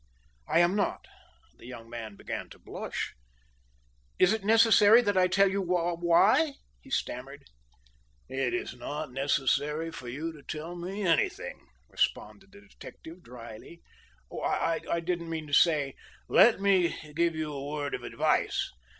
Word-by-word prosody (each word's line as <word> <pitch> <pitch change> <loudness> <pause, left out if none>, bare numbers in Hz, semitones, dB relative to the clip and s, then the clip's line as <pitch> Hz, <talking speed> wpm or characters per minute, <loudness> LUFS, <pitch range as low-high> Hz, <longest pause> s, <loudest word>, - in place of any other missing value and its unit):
"I 170 - +4
am 175 +3 +3
not." 205 - -1 0.5
The - - -13
young 120 -2 -10
man 115 -3 -7
began - - -6
to - - -14
blush. - - -5 1.0
"Is 185 +3 +4
it 220 -3 -3
necessary 225 +1 +6
that 205 -3 0
I 185 -1 +4
tell 195 +2 +4
you 200 +1 -1
why?" 175 - +3 0.3
he 270 - -16
stammered. 135 - -4 0.8
"It 130 -2 -1
is - - -3
not 125 +2 -6
necessary 145 +4 0
for 125 - -9
you 155 +6 -4
to 150 - -13
tell 155 +4 -6
me 190 +4 -5
anything," 400 - -1 0.2
responded 195 -1 -2
the 200 0 -15
detective 180 -3 -13
dryly. 120 +6 -12 0.6
"I 165 0 -1
didn't 170 -1 -3
mean 160 -1 -4
to 145 - -11
say 145 -4 +4 0.2
" - - -25
"Let 230 -4 +6
me 190 -4 +2 0.2
give 170 +1 +1
you 155 -1 -3
a 140 0 -5
word 145 -1 -3
of - - -3
advice. - - 0
165 Hz, 150 wpm, -29 LUFS, 145-195 Hz, 1.0 s, necessary